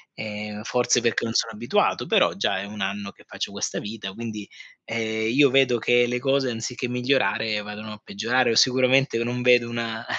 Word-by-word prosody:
Ehm, 105 0 -6
forse 125 +1 +2
perché 115 0 0
non 115 - -3
sono 115 - 0
abituato, 115 +3 0
però, - - +3
già 95 - -1
è 100 - -5
1 105 0 -9
anno 100 +1 -3
che - - -21
faccio - - -5
questa - - -3
vita, 105 -2 -7
quindi, 110 -2 -6 0.4
ehm, 110 -1 -2
io 140 +1 +5
vedo 130 -2 +3
che 120 +2 +3
le 125 +1 -2
cose 135 0 +1
anziché 120 +2 -4
migliorare, 120 -4 0
vadano 105 +1 -8
a 105 - -13
peggiorare 120 +4 0
o - - 0
sicuramente 130 0 +4
non 120 +1 -3
vedo 125 -1 +4
una, 115 -1 -4
115 Hz, 190 wpm, -24 LUFS, 105-125 Hz, 0.4 s, io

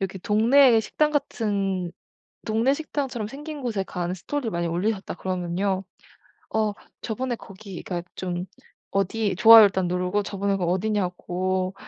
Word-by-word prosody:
이렇게 190 0 -3
동네의 230 +5 +5
식당 300 +7 0
같은 200 - -1 0.5
동네 225 +5 +2
식당처럼 270 -7 -3
생긴 295 +3 -7
곳에 220 -6 -1
가는 180 -1 -3
스토리를 230 +5 -3
많이 170 0 -1
올리셨다 190 +4 -2
그러면요. 185 +1 -2 0.7
어 215 -1 +2 0.3
저번에 240 +2 -2
거기가 190 -4 -7
좀 180 -1 -4 0.4
어디 195 0 0
좋아요 225 +1 +10
일단 190 -2 +1
누르고 180 +3 0
저번에 200 0 -1
그 185 - -2
어디냐고 185 -1 -1
200 Hz, 315 characters per minute, -25 LUFS, 185-225 Hz, 0.7 s, 좋아요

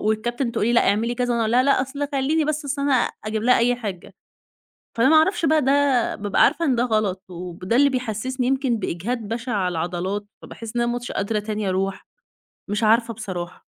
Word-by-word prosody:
والكابتن 235 +3 -1
تقول 215 - 0
لي: 235 - +2
"لأ، 235 - +4
اعملي،" 225 +4 +1
كذا. 245 0 -1
وأنا 235 - 0
أقول 220 - 0
لها: 250 +1 +5
"لأ، 275 -1 +3
أصل 280 +2 -4
خلّيني 290 +4 +1
بس 305 0 -2
أصل 280 0 -2
أنا" 285 -1 +2 0.3
أجيب 215 0 -2
لها 250 +1 +4
أي 245 +1 +3
حِجّة. 200 -7 -7 0.8
فأنا 230 +3 +4
ما 315 - +6
أعرفش 330 +3 +3
بقى 310 0 +3
ده، 275 -2 +2
بابقى 205 -1 +1
عارفة 335 - +2
إن 265 -5 +2
ده 235 - +2
غلط 215 -5 -1
وب 175 -1 -8
ده 235 - +3
اللي 280 +1 +5
بيحسِّسني 255 +1 -2
يمكن 265 -2 +1
بإجهاد 210 +5 -3
بَشِع 235 +2 -3
على 190 -3 0
العضلات، 180 +4 -3 0.2
فباحِس 230 +1 -9
إن 240 - +2
أنا 240 0 0
مش 245 0 -5
قادرة 210 +2 -1
تاني 210 -1 -3
أروح، 190 +1 -2 0.6
مش 210 +2 -1
عارفة 230 +2 +3
بصراحة. 185 -5 -6
235 Hz, 210 wpm, -22 LUFS, 205-260 Hz, 0.8 s, ما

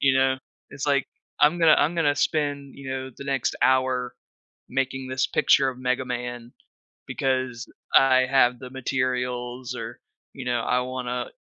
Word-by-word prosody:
you 135 -1 +4
know? 130 0 +2 0.3
It's, 145 0 -5
like, 140 -2 +2 0.3
"I'm 150 +4 +5
gonna 165 -2 +7
I'm 155 +4 +2
gonna 150 -4 +2
spend, 145 -2 -1
you 135 -1 -7
know, 130 0 -4
the - - -8
next 135 -2 -1
hour 130 -1 +2 0.5
making 135 0 -2
this 130 0 0
picture 135 - +3
of 130 -1 -5
Mega 130 +1 0
Man 120 -1 -5 0.6
because 130 -2 -2 0.3
I 130 -1 +6
have 125 -2 +3
the 130 - -8
materials 125 -1 -2
or, - - -7 0.3
you 135 - -7
know, 120 -1 0
I 125 +2 +1
wanna 125 -1 -3
130 Hz, 160 wpm, -25 LUFS, 125-135 Hz, 0.6 s, gonna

